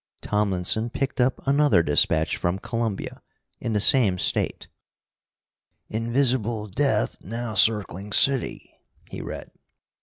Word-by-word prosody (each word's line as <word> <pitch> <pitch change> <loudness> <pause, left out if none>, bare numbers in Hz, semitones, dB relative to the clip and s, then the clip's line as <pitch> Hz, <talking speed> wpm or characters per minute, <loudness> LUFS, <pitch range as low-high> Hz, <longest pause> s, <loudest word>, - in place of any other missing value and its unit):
Tomlinson 105 +2 0
picked 130 +1 -2
up 125 +1 0
another 140 - +3
dispatch 80 +2 +2
from 85 +2 -2
Columbia, 115 0 -4 0.4
in 115 - -3
the 105 - +1
same 105 -3 +4
State: - - -2 1.2
"Invisible 115 -1 0
Death 135 +8 0
now 115 +3 -5
circling 105 -1 +2
city," 135 +4 +1 0.4
he - - -6
read. - - -8
110 Hz, 110 wpm, -24 LUFS, 100-125 Hz, 1.2 s, same